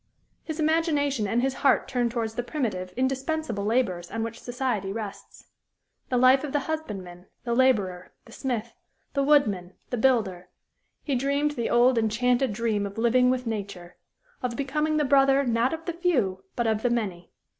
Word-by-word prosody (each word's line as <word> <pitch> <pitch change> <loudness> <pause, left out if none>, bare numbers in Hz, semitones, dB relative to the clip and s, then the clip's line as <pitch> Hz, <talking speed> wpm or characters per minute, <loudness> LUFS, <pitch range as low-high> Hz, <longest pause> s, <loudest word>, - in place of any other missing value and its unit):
His 315 0 -6
imagination 300 -7 +1
and 235 +5 +1
his 270 0 +1
heart 280 - +3
turned 245 -2 0
towards 230 -2 -3
the 245 - -2
primitive, 220 - -3
indispensable 265 -3 -1
labors 205 -6 0
on 225 0 -3
which 230 0 -5
society 245 -6 -2
rests 210 -1 -7 0.6
the 250 - +1
life 255 +2 +5
of 295 - -5
the 290 - +1
husbandman, 195 - -6 0.2
the 235 - -1
laborer, 205 -8 +1
the 230 - -16
smith, 235 -2 -3 0.4
the 280 - +1
woodman, 210 -11 +2 0.2
the 245 - -1
builder; 215 -8 +1 0.5
he 285 - -2
dreamed 280 +3 +1
the 235 -5 -2
old, 240 0 +4
enchanted 245 +3 +1
dream 210 -1 -1
of 200 - -11
living 245 +2 +3
with 255 0 0
nature; 200 -5 -5 0.5
of 245 -2 -2
becoming 300 +3 0
the 300 - +2
brother 275 0 +4
not 235 +1 +1
of 325 0 -5
the 345 - -2
few, 245 - 0
but 240 - 0
of 220 -1 +1
the 245 - +1
many. 195 -8 -2
245 Hz, 170 wpm, -26 LUFS, 210-275 Hz, 0.6 s, life